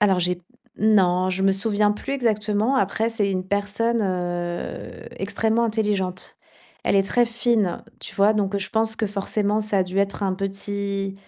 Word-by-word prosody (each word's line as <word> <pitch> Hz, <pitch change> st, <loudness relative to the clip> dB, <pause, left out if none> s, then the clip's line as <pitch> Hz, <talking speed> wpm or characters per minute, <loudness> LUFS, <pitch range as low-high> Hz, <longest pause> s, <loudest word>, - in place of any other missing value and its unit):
Alors 195 Hz, -3 st, +4 dB
j'ai 180 Hz, 0 st, 0 dB, 0.4 s
non, 185 Hz, -4 st, +3 dB
je 190 Hz, +1 st, 0 dB
me 195 Hz, -, +5 dB
souviens 205 Hz, +1 st, +2 dB
plus 240 Hz, +6 st, -5 dB
exactement. 220 Hz, -1 st, +1 dB
Après, 220 Hz, -1 st, +1 dB
c'est 210 Hz, -4 st, 0 dB
une 185 Hz, -1 st, -2 dB
personne, 205 Hz, +4 st, 0 dB
heu, 175 Hz, -2 st, -3 dB
extrêmement 225 Hz, +1 st, 0 dB
intelligente. 205 Hz, -5 st, -1 dB, 0.5 s
Elle -, -, +2 dB
est 195 Hz, -, +4 dB
très 240 Hz, +5 st, +2 dB
fine, 230 Hz, -5 st, 0 dB, 0.2 s
tu -, -, -7 dB
vois? 200 Hz, +2 st, +5 dB
Donc 200 Hz, -2 st, 0 dB
je 190 Hz, -1 st, -3 dB
pense 220 Hz, 0 st, 0 dB
que 220 Hz, -, 0 dB
forcément, 205 Hz, +1 st, 0 dB
ça 210 Hz, -2 st, 0 dB
a -, -, +4 dB
dû 185 Hz, +2 st, -3 dB
être 200 Hz, +1 st, 0 dB
un 190 Hz, -1 st, +1 dB
petit, 195 Hz, 0 st, -3 dB
200 Hz, 170 wpm, -23 LUFS, 190-220 Hz, 0.5 s, me